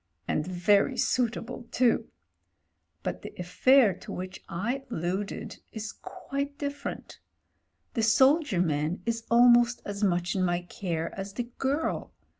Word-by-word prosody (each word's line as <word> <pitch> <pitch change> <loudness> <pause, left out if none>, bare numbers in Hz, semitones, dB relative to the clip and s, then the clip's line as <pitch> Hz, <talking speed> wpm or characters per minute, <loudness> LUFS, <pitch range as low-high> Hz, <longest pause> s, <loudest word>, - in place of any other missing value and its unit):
And 155 - 0
very 185 +3 +3
suitable 240 0 -1
too. 245 -2 +2 1.0
But - - -3
the - - -9
affair 215 +6 +4
to - - -9
which 185 +1 -6
I 235 +10 -2
alluded 190 0 -3
is 215 -1 -5
quite 280 +1 -5
different 285 0 -5 0.7
The 230 - 0
soldier 265 - +4
man 155 +1 -1
is 230 0 -2
almost 240 0 +6
as 205 +1 -4
much 175 -2 +1
in 190 - +1
my 175 -1 +1
care 170 -3 -3
as 195 0 -6
the 245 - -2 0.2
girl. 280 +4 -1
215 Hz, 130 wpm, -28 LUFS, 180-250 Hz, 1.0 s, almost